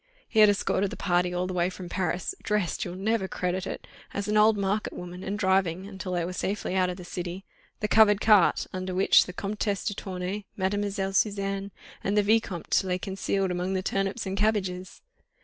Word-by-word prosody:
He 220 - +1
had 210 -1 +8
escorted 200 -1 +1
the - - -8
party 180 -1 +1
all 180 +1 -1
the 185 - -4
way 175 0 +1
from 185 -1 -8
Paris, 185 - -2
dressed—you'll 185 -3 -1
never 200 +1 0
credit 185 +1 -2
it!—as 200 +1 -7
an 210 - 0
old 215 0 +5
market 200 +2 -1
woman, 180 +1 -8
and 200 +2 -3
driving—until 190 0 0
they 175 -1 0
were 180 - -4
safely 195 0 -2
out 185 -1 +2
of 180 - -4
the 180 - -9
city—the 180 +4 -6
covered 210 -2 +5
cart, 210 -5 +4
under 185 0 -3
which 190 - +5
the - - -5
Comtesse 200 +1 -2
de 205 - 0
Tournay, 190 +1 -5
Mlle. 195 0 -1
Suzanne, 195 -1 0 0.3
and 200 +2 0
the 210 - +5
Vicomte 200 -5 +1
lay 180 -1 -1
concealed 195 0 -1
among 180 +2 -1
the 185 - -1
turnips 195 +4 -1
and 190 0 -3
cabbages. 190 -3 -1
190 Hz, 185 wpm, -27 LUFS, 180-205 Hz, 0.3 s, had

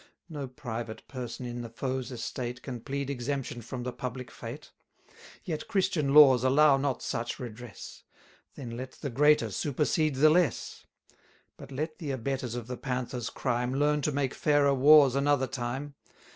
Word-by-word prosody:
No 145 -4 -5
private 120 -4 -6
person 125 -2 -6
in 120 0 -5
the 115 - -7
foe's 130 +2 -3
estate 120 0 -5
Can 125 -3 -5
plead 140 +2 -3
exemption 130 -2 -3
from 120 +2 -6
the 125 0 -4
public 125 -1 -6
fate. - - -9 0.7
350 - - -4
Yet 155 - -4
Christian 185 -9 +1
laws 135 -4 +8
allow 140 +2 +5
not 135 -2 -1
such 115 - -3
redress; 120 -2 -9 0.5
Then 120 -4 -7
let 130 +2 -6
the 140 - -6
greater 145 -3 +4
supersede 150 - 0
the 155 +3 +6
less. 165 -7 0 0.7
But - - -12
let 155 +4 -4
the 155 - -5
abettors 130 -2 -3
of 120 -2 -5
the 125 +1 -6
Panther's 125 -2 -3
crime 125 0 -1
Learn 150 +1 +2
to 150 - 0
make 140 -2 -1
fairer 145 -2 +3
wars 140 0 +7
another 140 0 +2
time. 130 +3 -4
130 Hz, 160 wpm, -29 LUFS, 120-145 Hz, 0.7 s, laws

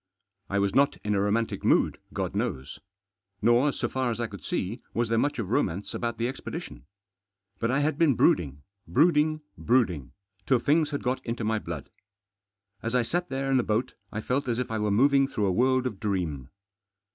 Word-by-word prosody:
I 100 - 0
was 100 -1 +1
not 140 +1 +3
in 105 - 0
a 100 - +2
romantic 105 +3 0
mood, - - +3
God - - -3
knows. 65 +2 -3 0.6
Nor, 120 +5 +4
so - - -2
far 130 -1 -1
as 115 -1 -3
I 120 - 0
could 100 -3 -9
see, 110 +7 -3
was 115 -1 +1
there 115 - +2
much 145 - 0
of 110 -4 -3
romance 95 -2 0
about 115 -1 -2
the 115 - 0
expedition. 70 - -7 0.7
But 115 - 0
I 135 +3 +2
had 150 0 0
been 155 -6 +4
brooding, 70 -9 +2 0.2
brooding, 155 +1 +3 0.2
brooding, 90 - +1 0.3
till 130 - +5
things 150 +4 +2
had 145 -1 -4
got 125 +1 -1
into 115 0 -3
my 110 0 +1
blood. 85 -7 -7 0.9
As 115 +2 -2
I 125 - +3
sat 175 +8 -2
there 135 0 -2
in 135 - +4
the - - +4
boat 115 +4 -1 0.2
I 110 - -3
felt 130 +4 -1
as 120 -2 0
if 125 -2 -3
I 110 - -1
were 105 0 0
moving 135 +6 +4
through 105 -6 -1
a 95 - +2
world 130 +6 +2
of 110 -7 -3
dream. 85 -11 -2
115 Hz, 200 wpm, -27 LUFS, 100-135 Hz, 0.9 s, till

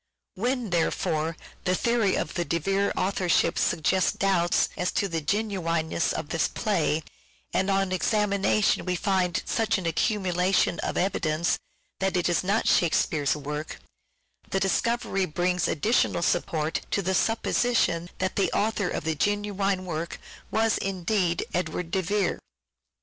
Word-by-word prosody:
When, 240 +1 -2
therefore, 165 -1 0 0.3
the 185 0 +1
theory 230 -2 +2
of - - -2
the 175 - -1
De 170 - -1
Vere 195 +4 0
author 185 -1 0
ship - - +3
suggests 170 +3 +2
doubts 180 -3 +2
as 180 - -1
to 200 - +1
the 165 -3 -2
genuineness 170 -3 0
of 145 - -4
this 165 - +1
play, 170 -8 0 0.5
and 190 - +1
on 195 -1 +1
examination 200 +1 +2
we 180 -1 -1
find 185 -1 0
such 225 -1 +1
an 190 - -5
accumula 185 +1 +1
tion 170 - +2
of - - -2
evidence 170 -3 0 0.4
that 190 -1 0
it 175 - +1
is 175 - +1
not 205 +4 +1
Shakespeare's 155 -3 +2
work, 150 +1 -5 0.7
the 195 - 0
discovery 195 -1 0
brings 180 +2 0
additional 190 - +1
support 160 -3 0
to 200 - 0
the 190 +2 0
supposition 225 -5 +1
that 185 0 -2
the 195 - +2
author 210 -3 0
of - - -3
the 160 0 0
genuine 200 +1 0
work 170 -1 -4 0.3
was 225 0 +1
indeed 185 -2 0
Edward 180 -1 -2
de 190 - +1
Vere. 200 +3 0
185 Hz, 145 wpm, -26 LUFS, 170-200 Hz, 0.7 s, ship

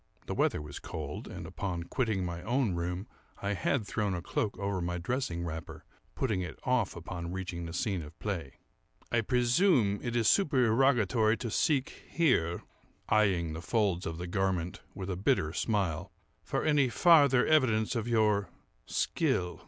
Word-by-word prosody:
(The - - -3
weather 75 - +1
was 75 -1 -8
cold; 75 -2 -6
and, - - -7
upon 90 -4 -4
quitting 110 -2 -1
my 85 -1 -4
own 120 +1 0
room, 90 +3 -3 0.3
I 100 +1 -1
had 105 +5 0
thrown 105 -2 -1
a 85 - -4
cloak 100 0 -2
over 100 -1 -2
my 90 0 -2
dressing 85 -3 -2
wrapper, 80 -1 -7 0.3
putting 110 -8 0
it 90 -3 -6
off 125 -6 +1
upon 85 0 -6
reaching 90 -2 -4
the 80 - -7
scene 95 0 -1
of 75 +1 -11
play.) 85 -10 -4 0.6
"I 120 - +3
presume 125 - +3
it 120 -1 -3
is 115 -2 +2
supererogatory 120 - +3
to 115 - -4
seek 140 +1 0
here 125 - +1 0.5
(eyeing 95 -7 +2
the 80 - -6
folds 95 -3 0
of 80 0 -4
the 90 - -5
garment 90 -1 -1
with 95 0 -4
a - - -2
bitter 95 - +1
smile) 95 -6 -1 0.3
for - - -2
any 145 -4 +3
farther 140 - +5
evidence 120 -8 +3
of 115 -1 -2
your 105 -5 +2 0.4
skill. 90 -1 0
100 Hz, 160 wpm, -30 LUFS, 85-120 Hz, 0.6 s, farther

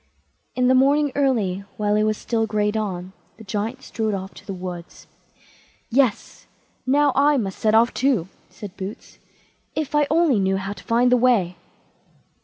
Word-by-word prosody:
In 250 -1 +2
the 260 - +5
morning 280 +2 +3
early, 220 -9 0
while 210 0 +1
it 210 - +2
was 215 0 0
still 225 -2 -1
grey 210 -1 0
dawn, 190 -4 -4 0.2
the 225 - -12
Giant 220 +6 -4
strode 220 -3 -2
off 190 0 -6
to - - -15
the - - -4
wood. 180 -2 -6 1.1
"Yes! 255 -3 0 0.4
now 285 +2 +4
I 285 +1 +4
must 195 -6 -3
set 215 0 +2
off 235 +2 +4
too", 250 -10 +1 0.2
said 205 -2 -10
Boots; 195 +1 -8 0.6
"if 310 -2 -3
I 295 -1 +3
only 315 -7 +3
knew 190 0 +1
how 195 +1 -4
to - - -14
find 240 +2 +2
the 250 - +5
way." 230 -8 +2
220 Hz, 170 wpm, -22 LUFS, 195-260 Hz, 1.1 s, the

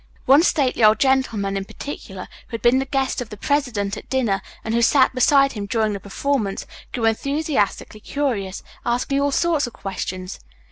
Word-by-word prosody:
One 275 +4 +7
stately 280 -8 +1
old 215 0 +7
gentleman 230 -7 +1
in 195 - -2
particular, 195 -7 -8 0.2
who - - -6
had 230 - -7
been 240 +2 +5
the 270 - -1
guest 270 -2 -1
of 240 - -6
the 210 - -9
president 235 -7 -1
at - - -11
dinner, 230 -8 +1 0.2
and 220 - -3
who 235 - +2
sat 260 +3 +4
beside 275 +2 +4
him 205 -2 -5
during 215 0 0
the 200 - -4
performance, 205 +1 -2 0.3
grew 235 -3 -2
enthusiastically 275 -3 -1
curious, 215 -7 -3 0.2
asking 250 +3 0
all 285 0 +1
sorts 320 -2 +1
of 240 - -10
questions. 185 -1 -5
240 Hz, 180 wpm, -22 LUFS, 205-275 Hz, 0.3 s, One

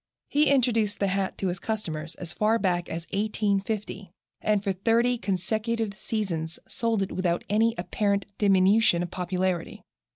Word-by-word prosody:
He 295 +1 +3
introduced 230 -6 +2
the 200 - +1
hat 195 0 -1
to 195 - -1
his 175 0 -3
customers 165 -8 -3
as 175 -2 -4
far 215 +2 +2
back 180 -5 0
as 165 +1 -5
1850, 205 -1 -1 0.3
and 210 -2 +1
for 195 -2 0
thirty 235 +5 +2
consecutive 215 +3 -1
seasons 175 -8 -3
sold 225 -4 0
it 190 - -5
without 175 -2 0
any 225 +2 +3
apparent 200 +3 0
diminution 195 -2 +4
of 175 - -6
popularity. 180 -1 -2
200 Hz, 150 wpm, -27 LUFS, 180-220 Hz, 0.3 s, diminution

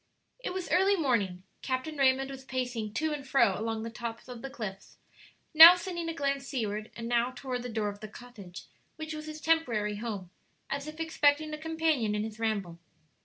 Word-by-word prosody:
It - - -4
was 370 -1 -4
early 385 +3 +4
morning; 215 - 0 0.2
Captain 260 +4 -3
Raymond 270 -1 +2
was 265 -1 -9
pacing 245 -5 -3
to 315 -1 0
and 290 -2 -5
fro 250 -7 +3
along 220 +1 -3
the 230 - -5
top 230 +1 -6
of 245 -2 -8
the 270 - -6
cliffs, 215 -8 -7 0.6
now 325 +3 +12
sending 345 -2 -4
a - - -2
glance 275 -2 -1
seaward, 215 -4 -3
and 230 0 -6
now 240 +1 +2
toward 255 -2 -4
the 245 - -6
door 215 -2 -1
of 205 0 -8
the 215 - -7
cottage 210 -5 -11 0.3
which 315 0 -6
was 305 0 -7
his 310 0 -7
temporary 240 -11 +1
home, 205 -5 -5 0.4
as 280 +1 -3
if 310 +1 -8
expecting 310 -1 +2
a - - -3
companion 315 -9 0
in 210 - -1
his 220 0 -7
ramble. 200 -7 -2
255 Hz, 195 wpm, -30 LUFS, 220-310 Hz, 0.6 s, now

